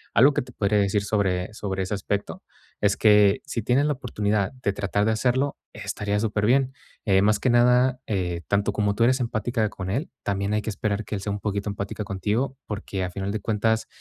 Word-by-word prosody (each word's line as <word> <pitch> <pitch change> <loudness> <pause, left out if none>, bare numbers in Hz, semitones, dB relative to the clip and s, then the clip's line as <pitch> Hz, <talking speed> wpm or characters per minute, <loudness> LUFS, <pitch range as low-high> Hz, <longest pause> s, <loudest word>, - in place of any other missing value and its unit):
Algo 140 +4 +6
que - - 0
te - - -11
podría 105 0 +1
decir 100 0 +1
sobre 100 -2 0
sobre 95 -3 -3
ese 95 - -3
aspecto 100 0 -3 0.4
es 100 -1 +2
que, 105 -2 +5
si 115 - -3
tienes 125 +6 +2
la 150 - +2
oportunidad 105 -6 -1
de 100 - +1
tratar 100 +1 0
de 110 - +3
hacerlo, 130 +5 +1 0.2
estaría 105 0 -2
superbién, 115 +5 +2 0.3
eh, 95 -3 +4
más 105 +1 +3
que 125 - +2
nada, 125 +1 +4
eh, 90 -4 -1
tanto 100 0 +1
como 105 -1 0
tú 115 - +2
eres 130 +3 +3
empática 115 -2 -1
con 95 -1 -5
él, 135 - -2
también 100 0 -1
hay 105 - -1
que 110 - -2
esperar 105 +1 -2
que - - -7
él 100 - -2
sea 100 - -3
un 100 - -3
poquito 100 0 -2
empática 100 +1 -4
contigo, 105 +7 -2
porque 100 -2 -4
a 90 - -3
final 95 +2 -3
de 110 - -2
cuentas, 110 +2 0
105 Hz, 210 wpm, -25 LUFS, 100-115 Hz, 0.4 s, Algo